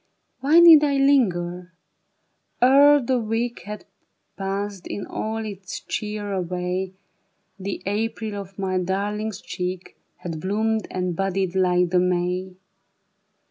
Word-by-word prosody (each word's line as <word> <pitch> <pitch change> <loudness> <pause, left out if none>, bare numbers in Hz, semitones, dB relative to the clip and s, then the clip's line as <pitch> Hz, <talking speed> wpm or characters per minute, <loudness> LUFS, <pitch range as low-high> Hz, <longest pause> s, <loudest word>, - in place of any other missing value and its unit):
Why 300 +5 +5
need 330 -3 +9
I 285 -2 +2
linger? 180 -10 +1 0.9
Ere 285 +3 +6
the 255 -1 0
week 230 +2 -2
Had 210 +1 -7 0.5
passed 195 -1 -4
in 200 - -5
all 220 0 -4
its 195 -3 -7
cheer 210 -1 -4
away, 180 +1 -2 0.7
The 195 +1 -5
April 215 +1 -2
of 195 -1 -8
my 190 -2 -1
darling's 205 +3 -2
cheek 180 0 -5 0.2
Had 165 -3 -6
bloomed 220 +4 -1
and 180 -2 -2
budded 190 0 -1
like 180 -2 +2
the 180 - +4
May. 180 +1 -1
195 Hz, 120 wpm, -23 LUFS, 180-220 Hz, 0.9 s, need